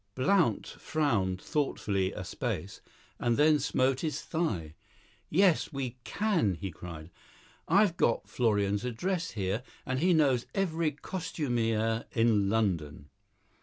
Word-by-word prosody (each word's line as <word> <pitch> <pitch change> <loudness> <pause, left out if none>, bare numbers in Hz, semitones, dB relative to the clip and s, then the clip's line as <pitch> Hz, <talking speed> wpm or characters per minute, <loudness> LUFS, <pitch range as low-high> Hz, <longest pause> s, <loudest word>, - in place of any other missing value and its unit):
Blount 165 +7 +2
frowned 110 -13 -1
thoughtfully 100 - -1
a - - -6
space, - - -4 0.4
and 120 -1 +1
then 150 0 +5
smote 130 -1 +1
his 155 0 -2
thigh. 100 - -2 0.6
"Yes, 180 0 +3
we 130 -4 -4
can!" 165 - +1
he 95 +2 -5
cried. 80 0 -9 0.6
"I've 195 0 +4
got 115 - +1
Florian's 105 -4 +1
address 165 +9 -2
here, 100 +2 -1 0.2
and 130 0 -1
he 180 +4 +4
knows 135 -6 +3
every 170 -4 +1
costumier 120 - -1
in 110 -4 +3
London. 85 -10 -1
125 Hz, 120 wpm, -30 LUFS, 100-160 Hz, 0.6 s, then